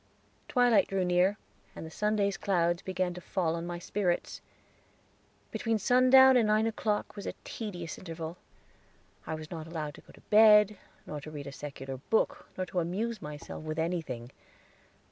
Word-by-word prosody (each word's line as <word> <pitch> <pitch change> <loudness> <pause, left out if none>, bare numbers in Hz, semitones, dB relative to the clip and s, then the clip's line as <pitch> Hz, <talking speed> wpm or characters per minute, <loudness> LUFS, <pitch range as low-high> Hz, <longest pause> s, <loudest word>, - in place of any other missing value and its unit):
Twilight 245 -4 +4
drew 190 -2 0
near, 180 +3 +3 0.4
and - - -7
the 160 - -9
Sunday's 210 0 +1
clouds 175 -3 +1
began 185 -1 -2
to 180 - -9
fall 170 -3 -1
on 170 0 -4
my 175 0 -4
spirits. 175 0 -2 1.1
Between 225 -1 0
sundown 255 +4 +6
and 235 -3 +4
nine 215 +1 +3
o'clock 215 -2 -1
was 200 - -7
a - - -4
tedious 180 -7 -6
interval. 165 -1 -6 0.9
I 160 - -2
was 155 0 -9
not 160 -2 -6
allowed 155 -3 -4
to - - -14
go - - -18
to - - -17
bed, 210 -1 +6 0.3
nor 150 -1 -6
to 155 - -9
read 145 -2 -7
a 140 - -6
secular 135 -2 -7
book, 220 - 0
or 185 - -1
to 185 - -2
amuse 200 +6 -2
myself 150 +1 -8
with 155 0 -4
anything. 160 -8 -3
180 Hz, 165 wpm, -30 LUFS, 160-210 Hz, 1.1 s, sundown